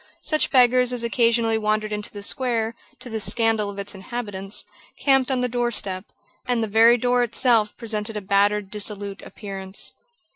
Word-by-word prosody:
Such 310 -1 +2
beggars 250 -1 +4
as 240 -1 -1
occasionally 230 0 +2
wandered 215 0 0
into 210 0 -4
the 205 -1 -8
square, 230 -1 -1 0.3
to - - -6
the 225 -2 -3
scandal 225 -1 +1
of 200 - -8
its 200 +1 -3
inhabitants, 200 -1 -5 0.3
camped 270 -2 +3
on 260 -2 0
the 250 - +1
doorstep; 230 -6 -2 0.4
and 245 -2 +1
the - - -1
very 225 +3 +6
door 245 +1 +2
itself 230 -2 +2
presented 220 -2 -3
a - - -3
battered, 200 +1 +1
dissolute 205 -1 -3
appearance. 195 -2 -6
220 Hz, 160 wpm, -23 LUFS, 205-240 Hz, 0.4 s, very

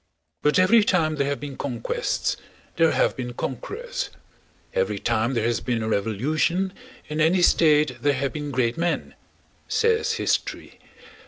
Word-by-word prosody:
"But 150 - +3
every 205 +5 +5
time 160 -6 +1
there 140 -1 +1
have 140 0 -2
been 145 -2 -7
conquests 120 -5 -2 0.4
there 165 -1 +4
have - - +1
been 125 -1 -5
conquerors; 475 - -4 0.6
every 485 -1 0
time 115 +4 0
there 115 - +1
has 120 0 +1
been 120 -3 -2
a - - -2
revolution 150 - 0 0.3
in 155 +1 -2
any 175 +3 +3
state 155 -3 +4
there 145 0 +3
have 135 0 -2
been 150 -1 -4
great 125 -2 0
men," 170 0 -1 0.5
says 450 0 +2
history. - - -2
150 Hz, 150 wpm, -24 LUFS, 125-180 Hz, 0.6 s, every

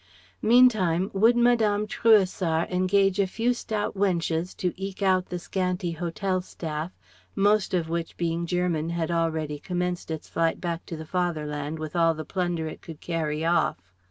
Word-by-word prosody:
Meantime, 215 -7 +4
would 225 +5 +4
Madame 225 -4 +3
Trouessart 190 -7 +2
engage 190 +2 +2
a 195 - +3
few 230 +6 0
stout 215 -3 -3
wenches 175 -3 -1
to 180 -2 -1
eke 195 +1 -5
out 185 -1 +2
the 180 - -4
scanty 180 -1 -2
hotel 180 +3 -2
staff, 160 -2 -5 0.4
most 205 -1 +2
of 170 -3 0
which 165 0 -4
being 170 0 -1
German 175 -3 0
had 170 -1 -2
already 160 -3 -1
commenced 180 +1 -3
its 160 -1 -5
flight 165 -1 0
back 170 -1 -4
to 165 - -5
the 160 - -7
fatherland 155 -4 -2
with 155 0 -6
all 165 -1 +3
the 155 0 -6
plunder 175 -4 -2
it 155 - -8
could 160 -2 -10
carry 160 -2 -2
off. 170 +1 +2
175 Hz, 160 wpm, -26 LUFS, 165-195 Hz, 0.4 s, Meantime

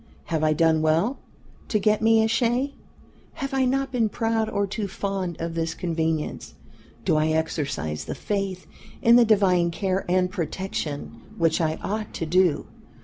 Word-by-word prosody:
Have 160 -2 -2
I 155 0 +4
done 160 0 +3
well 165 - +1 0.5
to 215 - +1
get 215 +1 +2
me 225 0 +5
a - - +2
shay? 245 +4 +1 0.6
Have 275 -4 -5
I 265 -1 +2
not 270 +1 0
been 235 -4 +1
proud 225 0 0
or 200 0 0
too 200 +1 -3
fond 190 -3 -3
of 165 0 -3
this 165 0 -2
convenience? 160 -2 -2 0.5
Do 155 - +3
I 155 +1 +2
exercise 145 - -2
the - - -4
faith 195 -3 -3 0.4
in 235 +1 +7
the 240 -1 +7
divine 190 -5 +3
care 190 +2 -1
and 180 0 +2
protection 155 -8 -4 0.2
which 165 0 +2
I 155 -1 +1
ought 215 +1 -3
to 165 - -2
do? 175 -2 +2
185 Hz, 165 wpm, -25 LUFS, 160-220 Hz, 0.6 s, in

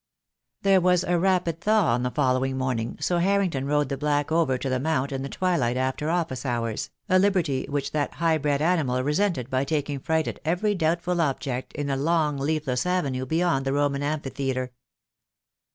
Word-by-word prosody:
There 195 -1 +5
was 180 0 +3
a 175 -1 +1
rapid 175 -3 +1
thaw 210 - +3
on 120 - 0
the 125 - 0
following 130 -1 0
morning, 125 -3 -2
so 175 -1 +1
Harrington 180 -7 +1
rode 145 -1 +1
the 140 - -2
black 145 0 0
over 160 -6 +2
to 135 - -4
the 130 -1 0
Mount 140 -1 0
in 135 -1 -3
the 135 - -4
twilight 140 -11 0
after 130 +4 -1
office 165 -7 -1
hours, 115 -4 -2 0.2
a 185 -1 +4
liberty 180 -9 +1
which 140 -1 -2
that 150 -1 -2
high 165 -2 +1
bred 145 0 0
animal 145 -8 +1
resented 150 - 0
by 130 +1 +1
taking 145 -1 -2
fright 160 +3 0
at - - -5
every 180 +6 +1
doubtful 175 0 0
object 135 -4 -2
in 145 - -3
the 135 -1 -1
long 150 0 +1
leafless 145 -1 -1
avenue 140 -8 -1
beyond 160 -2 +1
the 135 0 -1
Roman 145 -1 +1
Amphitheatre. 135 -3 -2
145 Hz, 185 wpm, -25 LUFS, 130-170 Hz, 0.2 s, There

